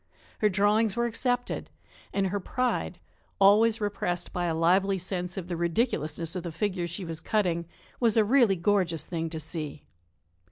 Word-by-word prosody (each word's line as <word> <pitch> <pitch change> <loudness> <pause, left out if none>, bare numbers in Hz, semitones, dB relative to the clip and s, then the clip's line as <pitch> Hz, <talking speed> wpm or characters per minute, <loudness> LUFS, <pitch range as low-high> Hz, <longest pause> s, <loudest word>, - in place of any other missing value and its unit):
Her 210 - +4
drawings 210 +2 +2
were 235 0 +1
accepted, 245 +1 -1 0.4
and 195 -1 0
her 205 +2 -1
pride 250 +6 -2 0.4
always 215 +3 +5
repressed 175 -4 -2
by 175 -1 -1
a 165 -2 0
lively 190 +4 +3
sense 180 0 -4
of 180 -2 -4
the 175 - -3
ridiculousness 170 - -1
of 180 - -2
the 170 -1 -5
figure 180 +1 -2
she 175 +2 -5
was 165 -1 -4
cutting 170 -3 0 0.3
was 230 -2 +3
a 220 - +5
really 235 -4 +4
gorgeous 175 -3 +1
thing 165 -2 -3
to 160 -1 -5
see. 155 -2 -6
190 Hz, 165 wpm, -28 LUFS, 170-210 Hz, 0.4 s, always